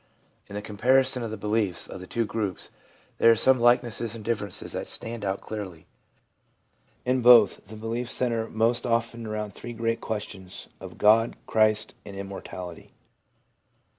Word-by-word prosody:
In 100 - -9
the 105 - -4
comparison 130 +5 +2
of 115 - -3
the 110 - -5
beliefs 105 -3 -1
of - - -8
the 90 - -10
two 115 -1 -1
groups, 105 -3 -3 0.5
there - - +6
are 115 - +7
some 130 +3 +4
likenesses 120 -1 +2
and 110 -2 -9
differences 105 -4 -3
that - - -4
stand 115 -1 -1
out 95 0 -2
clearly. 95 -7 -7 1.2
In 125 0 +2
both, 115 -6 +6
the 110 - -9
beliefs 115 +3 -4
centre 115 -3 -1
most 115 +2 +1
often 115 -1 -1
around 105 -1 -4
the - - -8
three 120 - -7
great 115 0 -1
questions 105 -4 -5
of - - -10
God, 115 +2 +4
Christ, 110 0 +2
and 100 -1 -9
Immor 100 0 -6
tality. 90 -2 -9
110 Hz, 165 wpm, -26 LUFS, 105-115 Hz, 1.2 s, are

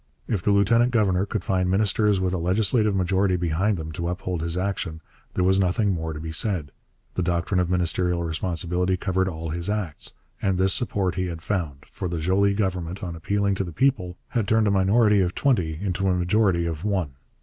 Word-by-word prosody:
If 100 -5 -1
the 105 - 0
lieutenant 110 +4 +4
governor 100 -5 +2
could 110 +1 -3
find 90 -1 0
ministers 105 +1 +2
with 95 0 0
a 90 - -1
legislative 105 +4 +1
majority 95 +1 +2
behind 90 +4 0
them 80 -1 -6
to 85 +2 -4
uphold 90 -1 -3
his 85 +1 -2
action, 90 -4 -2 0.4
there 90 - +1
was 95 +1 +3
nothing 100 +2 +2
more 80 -3 -2
to 75 - -6
be 80 +1 -5
said: 80 - -1 0.4
the - - -1
doctrine 85 +1 0
of 90 -1 0
ministerial 90 -1 +1
responsibility 90 +2 -1
covered 95 0 0
all 80 -3 -4
his 85 +3 -2
acts. 100 -8 -3 0.3
And 95 -2 +1
this 95 +1 +3
support 100 -7 0
he 90 +1 -2
had 85 -1 -6
found; 80 -9 -3
for - - -4
the 85 -1 -3
Joly 95 +5 +2
Government, 95 -3 -2
on 85 -2 -4
appealing 100 +4 0
to 95 - -1
the 85 - -6
people, 90 - 0
had 115 -5 -1
turned 110 +1 +3
a 100 - +2
minority 100 +2 +4
of 90 0 -1
twenty 90 - +1
into 95 0 -1
a 90 - +2
majority 90 -1 +2
of 80 -1 -4
one. 95 -8 -1
95 Hz, 205 wpm, -24 LUFS, 85-100 Hz, 0.4 s, lieutenant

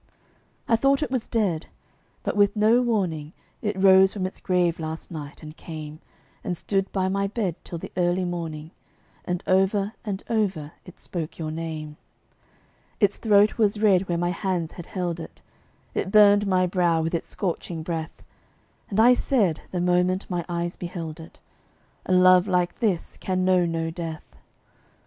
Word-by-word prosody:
I 230 - +4
thought 275 +4 +2
it 255 - -4
was 255 -3 -1
dead. 195 -8 0 0.6
But - - -2
with 205 0 +3
no 220 +3 +4
warning, 180 -10 -1 0.3
It 210 -3 -2
rose 190 0 +6
from 195 -3 -2
its 185 - -5
grave 175 -2 +1
last 160 +1 -6
night, 150 -1 -8
and 155 0 -9
came 155 -2 -8 0.4
And 180 -2 -2
stood 195 +2 -1
by 190 -1 0
my 200 +1 0
bed 200 -4 -2
till 170 - -6
the - - -8
early 180 +1 +1
morning, 165 -3 -5 0.5
And 180 -1 -2
over 195 +2 +2
and 200 -3 -4
over 195 -10 -1
it 180 - -14
spoke 165 -3 -5
your 155 -2 -4
name. 155 -2 -5 1.0
Its 205 -2 +2
throat 210 0 +3
was 210 -1 +2
red 195 -3 +3
where 170 - +1
my 175 +1 0
hands 180 -2 -2
had 175 - -10
held 175 -3 -3
it; - - -9 0.5
It - - -2
burned 205 -1 +6
my 185 -1 +3
brow 175 -2 +1
with 165 - -2
its 170 - -2
scorching 170 -3 -3
breath; 160 -1 -5 0.7
And 205 - -1
I 240 +3 +7
said, 210 - +1
the 180 - -3
moment 180 +2 +1
my 175 -1 -1
eyes 170 0 -3
beheld 165 -2 -6
it, 160 +1 -12 0.7
"A - - -1
love 185 +1 +6
like 180 -2 0
this 195 -7 -1
can 185 -1 -1
know 180 -2 +3
no 165 -1 -2
death." 165 -2 -7
180 Hz, 170 wpm, -25 LUFS, 165-200 Hz, 1.0 s, I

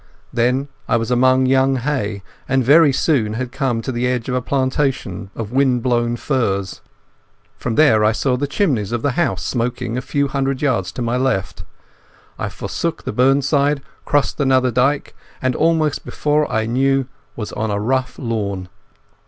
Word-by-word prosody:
Then 125 +4 +1 0.2
I 120 - +2
was 115 +1 -2
among 130 +1 +4
young 135 +1 +3
hay, 115 -7 -2 0.3
and 135 0 +2
very 145 +4 +6
soon 130 -7 +1
had 125 +2 -4
come 130 -4 -1
to 130 - -3
the 120 0 -1
edge 125 -2 -1
of - - -1
a 125 - 0
plantation 130 -7 -1
of 110 -2 -5
wind 130 -2 +2
blown 120 -1 +1
firs. 100 -8 -1 0.8
From 115 - -2
there 130 -9 +5
I 105 - +4
saw 125 +3 0
the 140 +3 -2
chimneys 140 - 0
of 120 -1 -2
the 145 - +2
house 95 -6 -1
smoking 120 0 -2
a - - -5
few 140 +1 0
hundred 135 0 -2
yards 115 -11 0
to 125 - -4
my 120 +1 0
left. 125 -7 -1 0.8
I - - -2
forsook - - -4
the - - -4
burnside, 140 +3 +2 0.2
crossed 145 -5 0
another 130 -2 +3
dyke, 135 +4 +1 0.3
and 130 -1 0
almost 160 -2 +1
before 150 0 0
I 110 -1 0
knew 135 +3 +1 0.3
was 105 -3 -5
on 110 +1 -2
a 100 0 -1
rough 125 +3 -1
lawn. 100 -7 -3
125 Hz, 170 wpm, -19 LUFS, 115-135 Hz, 0.8 s, very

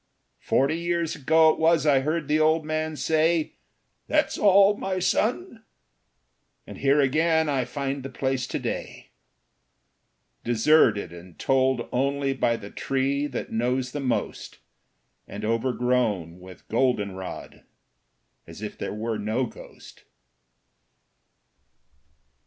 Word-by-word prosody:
Forty 140 +5 +1
years 170 -1 -1
ago 160 +3 +4
it - - -5
was 160 -1 +3
I 140 -3 +4
heard 155 +2 -2
the 150 +1 +2
old 155 0 +2
man 155 0 -2
say, 160 +1 +1 0.5
"That's - - +1
all, 200 0 +5
my 190 -2 -3
son." 225 - -1 1.0
And - - -10
here 140 +2 +3
again 160 +3 +2
I 135 -4 0
find 135 +1 -4
the 135 - -7
place 130 -1 -2
to - - -3
day, - - -6 1.3
Deserted 120 - +3
and 85 0 -13
told 130 -2 +1
only 140 +2 0
by 120 -3 0
the 100 - -10
tree 135 +2 -1
that 130 - -6
knows 125 +2 -1
the 145 - -4
most, 130 -4 -3 0.7
And - - -6
overgrown 115 -6 0
with 90 0 -14
golden 115 -4 +1
rod 95 0 -9 0.8
as 85 +6 -10
if 105 - -7
there - - -4
were 110 0 -3
no 110 +5 -1
ghost. 115 - -14
135 Hz, 125 wpm, -25 LUFS, 120-155 Hz, 1.3 s, all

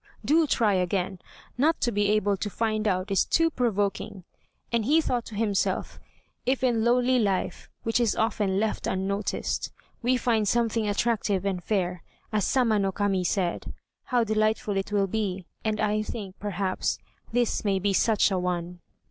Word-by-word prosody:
do! 315 +2 +4
try 225 -6 +2
again; 185 0 0 0.4
not 320 +4 +3
to 240 - +1
be 205 -1 +1
able 205 -1 +2
to 205 +2 -3
find 215 0 -1
out 185 0 0
is 195 - +4
too 330 0 +2
provoking," 205 - -1 0.5
and 230 -2 +1
he 300 +6 +4
thought 245 -6 -1
to 220 - -9
himself, 205 -2 -1 0.4
"If 260 +1 0
in 235 -3 +2
lowly 250 +2 +3
life, 200 -4 -1
which 225 +1 +1
is 235 -3 +2
often 205 -3 +1
left 220 +1 -1
unnoticed, 195 +2 -2 0.3
we 250 +1 +2
find 225 -4 +1
something 225 -1 +1
attractive 205 -2 0
and 185 -3 -1
fair, 180 -4 -1 0.3
as 210 -2 +2
Sama 230 -5 +2
no 195 -1 +1
Kami 195 -1 0
said, 180 -1 -1 0.3
how 245 -3 +2
delightful 215 -1 0
it 195 +1 -2
will 200 -1 +2
be, 195 -2 -2 0.2
and 215 -1 -1
I 215 0 +1
think, 205 -3 -6
perhaps, 195 -2 -1 0.3
this 240 -1 +1
may 200 -2 +1
be 195 +1 0
such 215 +1 +3
a 190 - +1
one." 180 -1 -3
210 Hz, 165 wpm, -27 LUFS, 195-230 Hz, 0.5 s, do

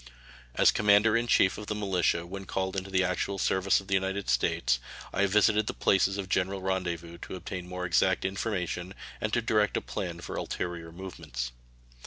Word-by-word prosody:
As - - +6
commander 105 +2 +4
in 120 +1 +1
chief 95 -4 +3
of 105 - -8
the 105 - -2
militia 90 -4 +1
when 95 +2 -7
called 95 0 -2
into 95 0 -3
the 95 0 +2
actual 90 +2 -1
service 95 0 +2
of 100 - -11
the 95 - -3
United 95 +1 0
States, - - +2 0.3
I - - 0
have 100 - +3
visited 105 +1 +3
the - - -3
places 95 0 +3
of 100 -2 -3
general 95 +2 0
rendezvous 85 -3 -3
to - - -7
obtain 90 0 -6
more 90 0 -4
exact 90 - +2
information 95 -2 -2 0.3
and 110 - -1
to 120 0 +1
direct 105 -2 +2
a - - +2
plan - - -4
for - - -6
ulterior 85 -2 -4
movements. 80 -9 -6
95 Hz, 190 wpm, -29 LUFS, 90-100 Hz, 0.3 s, As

